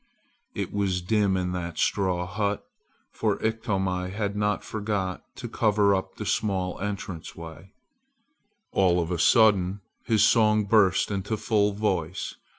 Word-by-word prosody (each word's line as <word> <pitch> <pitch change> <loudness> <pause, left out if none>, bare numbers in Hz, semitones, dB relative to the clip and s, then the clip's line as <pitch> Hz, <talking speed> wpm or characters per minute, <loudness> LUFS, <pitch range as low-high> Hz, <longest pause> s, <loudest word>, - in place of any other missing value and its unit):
It - - -4
was 95 -3 0
dim 100 -1 +2
in 90 -1 -1
that 85 -2 -4
straw 90 -3 0
hut, 100 +2 -2 0.5
for - - -1
Iktomi 95 -5 -1
had 100 +1 -3
not 105 0 0
forgot 100 -4 -3
to - - -6
cover 105 -2 +2
up 95 -1 -3
the - - -6
small 95 -4 -1
entrance 95 -4 -5
way. 85 +3 -11 1.0
All 90 -2 +3
of 85 0 -2
a 85 - -1
sudden 100 -3 +4 0.3
his 110 -2 +3
song 110 -2 +4
burst 100 -2 +3
into 100 +2 -2
full 105 -2 +1
voice. 95 -5 -2
100 Hz, 140 wpm, -26 LUFS, 90-105 Hz, 1.0 s, sudden